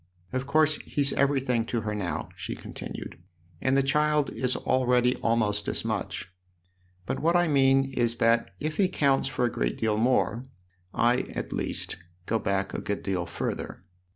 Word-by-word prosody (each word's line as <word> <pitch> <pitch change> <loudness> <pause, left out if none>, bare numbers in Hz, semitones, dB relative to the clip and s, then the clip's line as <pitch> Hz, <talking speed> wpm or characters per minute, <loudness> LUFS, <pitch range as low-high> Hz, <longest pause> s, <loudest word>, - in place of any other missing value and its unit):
Of 130 +1 -2
course 155 +1 +3
he's 140 -1 0
everything 135 -4 +2
to 115 - -1
her 105 0 -3
now," 100 -4 -3
she - - -5
continued, - - -8 0.2
" 85 -1 -31
and 130 +1 +2
the 135 - +4
child 150 +1 +2
is 130 -1 +1
already 125 -1 +2
almost 105 -3 0
as - - -2
much; 90 - -3 0.7
but - - -2
what 165 +3 +2
I 175 0 +4
mean 135 -2 +3
is 120 -2 +1
that 115 +1 +3
if 155 +1 -3
he 195 - +4
counts 140 -7 +2
for 125 -2 0
a 120 - 0
great - - -1
deal 110 -1 +1
more, 120 0 +1 0.4
I, 120 +3 +3 0.2
at - - -4
least, - - -2 0.3
go 115 +3 0
back 100 -1 -1
a - - -3
good 100 - -3
deal 90 -3 -1
further. 85 - -4
125 Hz, 175 wpm, -27 LUFS, 110-140 Hz, 0.7 s, the